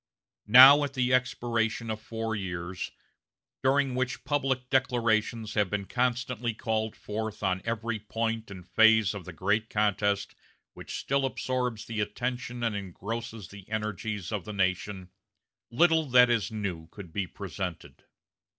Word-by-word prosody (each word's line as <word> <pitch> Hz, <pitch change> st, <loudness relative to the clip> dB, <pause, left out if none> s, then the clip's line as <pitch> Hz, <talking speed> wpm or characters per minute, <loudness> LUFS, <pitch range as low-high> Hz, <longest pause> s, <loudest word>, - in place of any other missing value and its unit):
Now, 130 Hz, +6 st, +10 dB
at 140 Hz, -1 st, -4 dB
the 125 Hz, -1 st, +1 dB
expiration 115 Hz, -3 st, 0 dB
of 110 Hz, 0 st, -5 dB
four 115 Hz, 0 st, -3 dB
years, 90 Hz, -2 st, -4 dB, 0.7 s
during 135 Hz, 0 st, +2 dB
which 125 Hz, 0 st, -2 dB
public 135 Hz, -3 st, -1 dB
declarations 115 Hz, -4 st, +1 dB
have 105 Hz, -3 st, +1 dB
been 105 Hz, 0 st, -2 dB
constantly 120 Hz, -1 st, -1 dB
called 110 Hz, -2 st, -2 dB
forth 105 Hz, 0 st, -5 dB
on 95 Hz, -1 st, 0 dB
every 115 Hz, -1 st, -2 dB
point 115 Hz, +1 st, -3 dB
and 95 Hz, -3 st, -10 dB
phase 110 Hz, -2 st, +5 dB
of 100 Hz, -4 st, -7 dB
the 90 Hz, -, -7 dB
great 100 Hz, +6 st, 0 dB
contest 105 Hz, -1 st, 0 dB, 0.4 s
which -, -, -7 dB
still 140 Hz, 0 st, 0 dB
absorbs 125 Hz, -3 st, -2 dB
the 115 Hz, -2 st, -4 dB
attention 120 Hz, +3 st, -3 dB
and 115 Hz, -3 st, 0 dB
engrosses 105 Hz, +2 st, -6 dB
the 100 Hz, -1 st, -13 dB
energies 105 Hz, -2 st, -3 dB
of 105 Hz, -4 st, -2 dB
the 105 Hz, -, -7 dB
nation, 95 Hz, -1 st, -1 dB, 0.6 s
little 160 Hz, +5 st, +3 dB
that 125 Hz, -1 st, +6 dB
is 110 Hz, -4 st, 0 dB
new 95 Hz, -7 st, -4 dB
could 90 Hz, -1 st, -11 dB
be 100 Hz, -2 st, -2 dB
presented. 95 Hz, -3 st, -7 dB
110 Hz, 140 wpm, -28 LUFS, 100-125 Hz, 0.7 s, Now